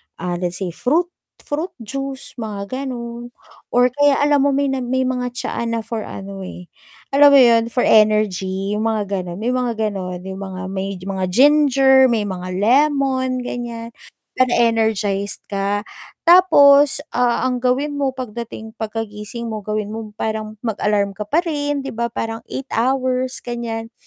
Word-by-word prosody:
ah, 175 0 -4
let's 180 +1 -3
say 175 - -3
fruit 320 - 0 0.3
fruit 310 +5 -4
juice 270 +4 -6
mga 205 -2 -5 0.2
ganun 235 -1 -6 0.4
or 245 0 +3
kaya 290 0 +3
alam 290 -1 +3
mo 285 - +3
may 280 +1 +1
nag 260 - -2
may 260 0 +1
mga 250 -1 -1
tsaa 235 - -3
na 230 -1 -2
for 225 -2 -4
ano 195 -1 -8
eh, 180 -1 -9 0.5
alam 285 +1 +8
mo 280 - +7
yun 235 -3 +6
for 245 - 0
energy 200 -2 +2
yung 220 +2 0
mga 200 -3 -1
ganun, 175 0 -7
may 240 +4 -1
mga 250 -2 0
ganon 195 -4 -2
yung 190 +1 -6
mga 190 -1 -6
may 195 0 -4
mga 190 +1 -3
ginger, 270 +1 +5
may 220 -3 +1
mga 185 -2 -5
lemon 260 +2 +2
ganyan, 235 -1 -6 0.4
para 255 -1 +2
energized 220 -4 0
ka. 200 +1 -2 0.4
Tapos, 290 -6 +6 0.2
ah, 245 0 +1
ang 250 -1 -2
gawin 265 +4 +1
mo 280 -1 0
pagdating 230 -2 -7
pagkagising 220 +1 -5
mo 220 -2 -4
gawin 210 0 -3
mo 220 -1 -6
parang 215 -1 -3
mag-alarm 205 -2 0
ka 210 - -10
pa 340 +4 +2
rin 290 -3 -2
'di - - -5
ba 235 +1 -1
parang 225 0 -4
8 270 - -5
hours 255 +1 0
ganyan, 230 -1 -5
230 Hz, 160 wpm, -20 LUFS, 205-260 Hz, 0.5 s, alam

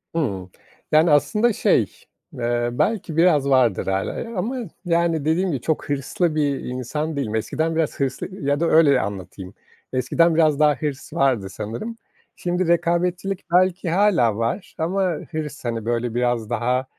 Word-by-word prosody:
Hımm. 100 - -2 0.4
Yani 155 +1 +5
aslında 210 - +3
şey, 225 - +3 0.5
eee, 120 -2 -1
belki 165 - -1
biraz 155 -5 +4
vardır 125 -9 +3
hâlâ, 95 0 -1
eee, - - -6
ama 240 +8 -2 0.3
yani, 170 -3 +1
dediğim 175 +4 +1
gibi, 135 -5 -3
çok 160 0 -2
hırslı 150 +4 -1
bir 145 -3 +1
insan 150 +5 -4
değilim. 115 -6 -2
Eskiden 160 +8 -1
biraz 160 -3 -1
hırslı 135 -2 -2 0.2
ya 145 +1 +1
da 170 - +1
öyle 145 -6 +5
anlatayım. 95 -1 -7 0.4
Eskiden 160 +6 +2
biraz 155 -3 +3
daha 150 -1 +4
hırs 140 -1 -5
vardı 120 -8 +1
sanırım. 115 - -6 0.4
Şimdi 175 0 -1
rekabetçilik 175 +2 0
belki 185 0 +3
hâlâ 170 - +3
var 115 - -3
ama 175 +5 -1 0.3
hırs, 150 -3 -5
hani, 115 -2 -3
böyle, 120 0 -1
biraz 120 -2 0
daha, 125 +2 0
150 Hz, 150 wpm, -22 LUFS, 120-170 Hz, 0.5 s, Yani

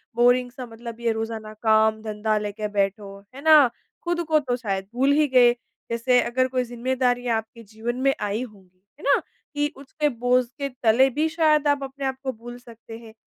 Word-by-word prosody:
Boring 245 +1 +3
सा 255 0 -8
मतलब 235 0 -10
ये 235 -1 0
रोजाना 220 -1 -5
काम-धंधा 220 -1 +2
लेके 210 0 -3
बैठो 200 0 -1
हो, 200 0 -10 0.2
है 275 - -9
ना, 305 -5 +7 0.3
खुद 345 0 -1
को 310 -1 +4
तो 250 -4 -2
शायद 195 -5 -3
भूल 270 +3 +3
ही 300 0 +3
गए। 245 -2 +5 0.4
जैसे 245 +2 +2
अगर 255 +2 0
कोई 255 -1 -1
ज़िम्मेदारियाँ 245 -1 -1
आपके 225 +1 -8
जीवन 220 +3 -5
में 275 0 +3
आई 210 +3 -1
होगी, 190 -5 -15 0.2
है - - -14
ना? 280 - +3 0.3
कि 295 +1 0
उसके 295 +2 -2
बोझ 245 0 +1
के 280 0 -2
तले 250 +1 +3
भी 305 +5 0
शायद 310 -3 +2
आप 285 -1 +1
अपने 270 +1 -6
आपको 265 0 -3
भूल 240 +1 -10
सकते 230 -2 -12
हैं। 225 -1 -14
245 Hz, 190 wpm, -24 LUFS, 220-265 Hz, 0.4 s, ना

